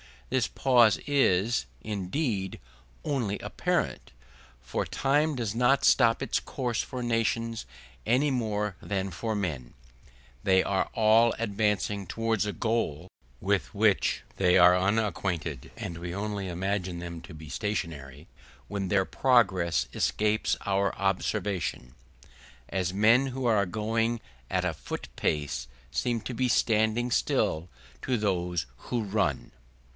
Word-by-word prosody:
This - - +2
pause 120 - +4
is, 120 -6 +2 0.2
indeed, 100 - -2 0.4
only 120 -9 -1
apparent, - - -2 0.5
for 65 -1 -2
time 145 +3 +1
does 115 -5 -2
not 125 +4 +3
stop 115 -3 +4
its - - 0
course 125 -4 -2
for 125 -2 -5
nations 115 -1 0 0.4
any 130 +6 +3
more 105 -6 -1
than 95 -1 -2
for 110 +6 -3
men; 75 -12 -3 0.7
they 95 +4 +4
are 95 -1 0
all 110 +1 +5
advancing 105 -2 0
towards 115 -1 0
a 105 - -2
goal 110 -10 -1 0.3
with - - 0
which - - +2
they 90 -1 +4
are 90 0 +7
unacquainted; 90 - -1
and 85 - -5
we 85 +1 -5
only 100 -1 -3
imagine 90 0 -2
them 85 -1 -6
to 85 - -11
be 80 -1 -10
stationary 75 -4 -4 0.4
when 100 -2 -2
their 95 -1 +2
progress 95 -12 +2
escapes 105 0 +1
our 100 0 +1
observation, 95 - -1 0.8
as 90 -1 -1
men 115 +7 +4
who 130 0 -4
are 110 -4 +3
going 115 +4 0 0.3
at - - 0
a - - 0
foot - - -7
pace 75 -5 -1 0.2
seem 115 - -1
to 125 - -5
be 125 +2 +1
standing 115 0 +2
still 80 -6 +1 0.3
to 130 -2 0
those 90 - -1 0.2
who 120 -3 -1
run. 100 -9 -1
105 Hz, 130 wpm, -28 LUFS, 90-115 Hz, 0.8 s, are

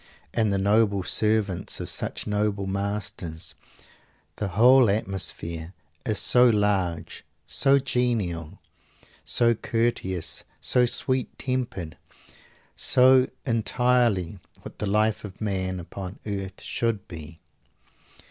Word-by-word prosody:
And 110 -3 +1
the 100 - +1
noble 100 0 +2
servants 105 -3 0
of - - -4
such - - -3
noble 105 -1 -1
masters! 100 -4 -4 0.8
The 105 - -2
whole 120 +5 +5
atmosphere 95 -4 -2 0.3
is - - 0
so 125 0 +6
large, 95 -6 0 0.2
so 135 +2 +3
genial, 115 - -1 0.7
so 120 -1 +3
courteous, 115 -6 -2 0.2
so 125 -1 +2
sweet 130 +1 +2
tempered, 120 -11 -3 0.8
so 130 0 +5 0.2
entirely 115 -5 +1 0.2
what - - -11
the 105 - -2
life 105 +2 +1
of 100 -2 -9
man 95 -3 -2
upon 95 +2 -8
earth 100 -2 -5
should 115 -4 -2
be. 80 -1 -10
105 Hz, 105 wpm, -25 LUFS, 95-115 Hz, 0.8 s, so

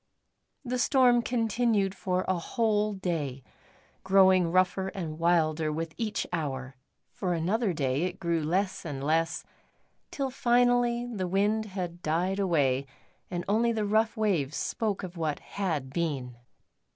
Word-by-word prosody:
The 250 0 -2
storm 250 -2 +4
continued 225 -4 +1
for 185 -1 -1
a 185 - +2
whole 215 +1 0
day, 155 -9 -3 0.6
growing 190 -2 +5
rougher 185 +1 +2
and 165 -5 -5
wilder 160 -2 +2
with 160 +1 -4
each 220 -2 -2
hour. 135 -5 -3 0.4
For 180 -3 -2
another 195 +6 0
day 140 0 0
it 185 +1 -5
grew 170 -2 0
less 185 +5 -1
and 140 -5 -5
less, 160 +3 +1 0.7
till 270 -2 -3
finally 245 -1 +2
the 210 -7 -3
wind 205 +4 +1
had 180 -4 -5
died 180 +5 0
away 140 -8 +1 0.4
and 175 -1 -4
only 225 +4 +2
the 220 -2 -1
rough 220 +2 +1
waves 175 -10 0
spoke 215 -5 -2
of 180 -1 -7
what 155 -3 -1
had 155 -10 -3
been. 135 -7 -2
185 Hz, 140 wpm, -28 LUFS, 160-215 Hz, 0.7 s, growing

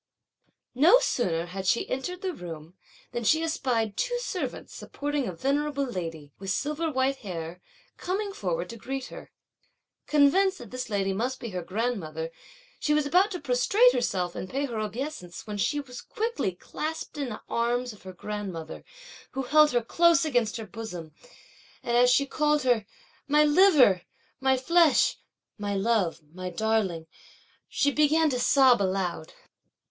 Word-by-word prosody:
No 320 - +7
sooner 180 - 0
had 190 +2 -6
she 205 - +2
entered 360 +9 -4
the 375 -1 -1
room, 165 - -9 0.4
than 240 -1 -3
she 315 +8 +3
espied 240 -9 -1
two 485 - -1
servants - - -4
supporting 290 -2 -3
a - - -2
venerable 280 - 0
lady, 165 - -6
with 195 0 -6
silver 300 +8 -1
white 265 0 +1
hair, 175 -5 -7 0.4
coming 395 +2 -3
forward - - -2
to 230 - -9
greet 265 +3 -5
her. - - -11 0.8
Convinced 370 +7 +4
that 235 - -11
this 255 -1 -5
lady 195 -2 0
must 250 +6 -2
be 235 - -6
her 180 -1 -3
grandmother, 170 -6 -3 0.5
she 300 - +1
was 300 -1 +2
about 360 +7 +4
to 365 -4 -5
prostrate 365 - +4
herself 180 -7 -1
and 185 - -6
pay 275 +2 -1
her 235 -5 -4
obeisance, 215 - -5
when 210 -2 -5
she 295 +8 +1
was 250 -3 -8
quickly 430 - -2
clasped 310 - -6
in 275 -3 -2
the 215 - -7
arms 240 +1 -1
of 210 - -17
her 190 +1 -9
grandmother, 190 -4 -6 0.5
who 270 - -2
held 305 +3 +5
her 240 -4 +1
close 335 +5 +4
against 245 -7 0
her 225 - -6
bosom; 185 -6 -7 0.7
and 235 - -1
as 245 +1 +6
she 280 +3 +4
called 300 +1 +1
her 240 -5 +2 0.4
"my 300 +1 +5
liver! 295 - +5 0.4
my 265 0 +3
flesh!" 330 +4 +4 0.4
(my 205 -1 -2
love! 195 -6 0
my 185 0 -5
darling!) 195 -4 0 0.6
she 285 - +1
began 305 +1 +3
to 250 - -1
sob 255 -2 +5
aloud. 185 -4 -2
245 Hz, 160 wpm, -27 LUFS, 195-300 Hz, 0.8 s, No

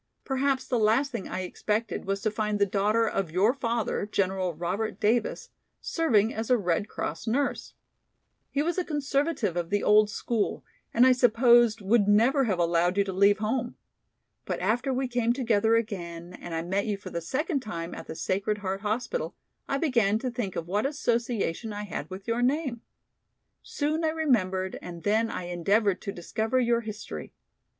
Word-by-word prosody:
Perhaps 270 0 0
the 245 - 0
last 225 +6 +3
thing - - -4
I 185 - -3
expected 210 +4 -2
was 195 0 -2
to 215 - 0
find 210 -1 -1
the 200 - +3
daughter 210 +4 +2
of 195 -5 -1
your 190 +8 +3
father, 235 -6 -1
General 190 -2 0
Robert 180 +7 -3
Davis, 220 +2 0 0.3
serving 230 - +2
as 220 +1 -4
a 250 - +5
Red 180 -1 0
Cross 165 +9 -4
nurse. 275 +5 -1 0.7
He 285 - 0
was 345 +3 0
a - - 0
conservative 285 - -1
of 170 -1 -2
the 205 0 0
old 210 0 +5
school, 220 0 -2 0.3
and 240 +2 +5
I 260 - +7
supposed 240 -2 +5
would 205 +1 +3
never 240 +7 +4
have 195 -5 0
allowed 175 +2 +2
you 200 - +4
to 195 -1 -4
leave 200 +2 +4
home. 235 +3 -2 0.7
But - - -3
after 245 +4 0
we 260 0 0
came 240 -1 +1
together 230 -3 +2
again 175 -6 -3
and 175 -2 -7
I 165 - -2
met 195 +5 -1
you 205 -2 -1
for 195 - -9
the 170 - -3
second 290 - -1
time 170 -8 -5
at - - -8
the 160 - -6
Sacred 200 +5 -1
Heart 195 -1 -3
Hospital, 240 - -2 0.3
I 275 - +1
began 235 -9 +2
to 250 +2 -3
think 235 -6 -4
of 165 - -4
what 205 +7 +1
association 235 - -1
I 205 0 -4
had 205 - -5
with 190 +1 -9
your 230 +1 0
name. 260 -2 0 0.8
Soon 310 +3 -2
I 320 - +3
remembered 200 -13 0
and 170 -2 -8
then 220 +3 +2
I 185 - -4
endeavored 190 +3 +1
to 200 - -4
discover 220 +7 -1
your 235 -1 +2
history. 215 -2 -7
215 Hz, 180 wpm, -27 LUFS, 195-245 Hz, 0.8 s, I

